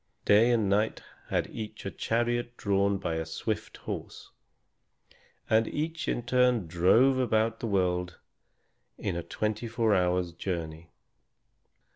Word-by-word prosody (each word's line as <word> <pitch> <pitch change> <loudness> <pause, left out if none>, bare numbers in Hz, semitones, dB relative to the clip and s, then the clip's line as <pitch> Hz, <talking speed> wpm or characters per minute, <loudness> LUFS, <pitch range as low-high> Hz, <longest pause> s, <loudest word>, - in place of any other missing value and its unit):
Day 110 +4 +6
and 115 -4 +2
Night 105 +3 +1 0.3
had - - 0
each 110 -1 -7
a 100 - -3
chariot 120 +1 -1
drawn 100 -2 +1
by 85 -4 -2
a 80 - -1
swift 80 - -4
horse, - - -7 1.2
and 110 0 +3
each 160 +2 -3
in 120 - -1
turn 125 -4 +2
drove 105 +11 +4
about 115 -2 +1
the 115 - -3
world 90 -3 0 0.8
in - - -3
a 85 - -2
twenty 110 +6 -3
four 115 -1 +1
hours' 90 -2 +1
journey. 85 -2 -5
105 Hz, 130 wpm, -29 LUFS, 90-120 Hz, 1.2 s, Day